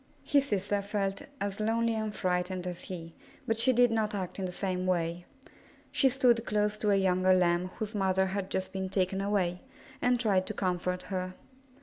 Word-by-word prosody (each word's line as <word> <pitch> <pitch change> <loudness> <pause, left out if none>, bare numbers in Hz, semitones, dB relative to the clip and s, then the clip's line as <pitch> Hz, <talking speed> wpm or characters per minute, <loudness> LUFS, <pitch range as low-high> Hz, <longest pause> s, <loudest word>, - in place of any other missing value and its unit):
His 280 -1 +3
sister 205 -1 0
felt 200 -1 -2 0.2
as 200 0 -3
lonely 230 +2 +1
and 220 -1 -2
frightened 180 -1 -1
as 180 -1 -5
he, 165 -3 -7 0.3
but 225 - +1
she 230 +4 +3
did 245 -1 +4
not 215 -2 0
act 190 -1 -4
in 190 - -1
the 180 - -3
same 185 0 -2
way. 175 -1 -1 0.6
She 270 - +4
stood 245 -3 +3
close 210 -1 0
to 210 - +1
a 200 - +5
younger 185 -1 +3
Lamb 175 0 +2
whose 215 0 -4
mother 190 -2 +2
had 190 0 -3
just 190 0 -2
been 190 -1 -3
taken 190 0 0
away, 190 -3 0 0.4
and 245 0 +3
tried 200 -5 +2
to 215 - -4
comfort 180 -1 -1
her. 185 -1 -4
195 Hz, 190 wpm, -30 LUFS, 185-215 Hz, 0.6 s, a